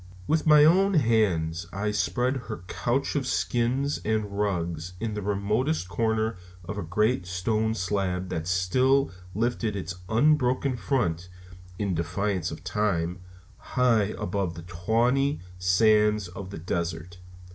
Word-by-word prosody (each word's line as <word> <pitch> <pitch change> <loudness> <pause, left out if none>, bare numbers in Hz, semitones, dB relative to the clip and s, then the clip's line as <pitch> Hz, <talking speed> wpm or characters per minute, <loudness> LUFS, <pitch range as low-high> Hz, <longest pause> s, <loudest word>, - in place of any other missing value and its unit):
With 160 - +1
my 150 -1 +8
own 190 +4 +4
hands 90 - +1
I 100 +3 -2
spread 105 +6 0
her - - -6
couch 130 +9 -1
of 135 -3 0
skins 130 +4 0
and 110 -1 -1
rugs 90 -4 -2
in 115 0 -3
the 105 - -3
remotest 105 - 0
corner 110 -1 0 0.3
of 100 +3 -5
a - - -2
great 100 +2 0
stone 110 +5 0
slab 90 -2 -1
that 80 -2 -3
still 130 +10 +2 0.2
lifted 115 -1 -1
its 90 -2 -5
unbroken 130 +1 +2
front, 95 - -1 0.5
in 100 -3 -1
defiance 90 +2 -1
of 80 - -8
time, 90 -3 -1 0.6
high 115 -5 +3
above 90 -2 -2
the 85 - -8
tawny 115 - +1 0.2
sands 105 +2 +3
of 95 +1 -8
the 100 - -7
desert. 85 +1 -4
105 Hz, 135 wpm, -26 LUFS, 90-120 Hz, 0.6 s, my